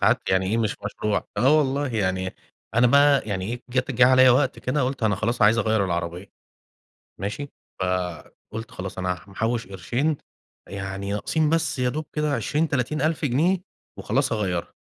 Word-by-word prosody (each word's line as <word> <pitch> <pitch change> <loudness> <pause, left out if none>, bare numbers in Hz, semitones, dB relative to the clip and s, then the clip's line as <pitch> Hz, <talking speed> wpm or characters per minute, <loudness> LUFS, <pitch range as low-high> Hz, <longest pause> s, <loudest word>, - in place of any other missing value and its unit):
ساعات - - +3
يعني 95 0 +2
إيه 110 +4 0
مش 110 -2 0
مشروع 105 0 -1
آه 140 +5 +5
والله 140 0 0
يعني 95 -2 -1 0.4
أنا 120 +2 +5
بقى 140 +2 +5
يعني 95 -2 -2
إيه، 120 +1 -5
جات 130 +1 -1
جه 125 0 +5
عليَّ 130 0 +7
وقت 130 +2 +3
كده 130 +3 -1
قلت 130 0 -2
أنا 110 -2 +3
خلاص 115 +5 -1
عايز 110 +2 +5
أغيَّر 110 -2 +2
العربية، 85 +1 -3 0.9
ماشي. 120 +9 -4 0.3
فقُلت 90 +4 -4
خلاص 95 0 -7
أنا 90 -2 -2
محوش 115 +4 -2
قرشين، 120 - -1 0.5
يعني 100 +1 -4
ناقصين 150 +9 0
بس 165 -3 0
يا 125 0 +1
دوب 150 +4 -3
كده 150 -1 0
20، 145 +7 0
30 140 +2 -1
ألف 160 +1 0
جنيه 155 +8 +2 0.4
وخلاص - - 0
هاغيَّرها. 95 -6 -2
115 Hz, 165 wpm, -24 LUFS, 95-140 Hz, 0.9 s, عليَّ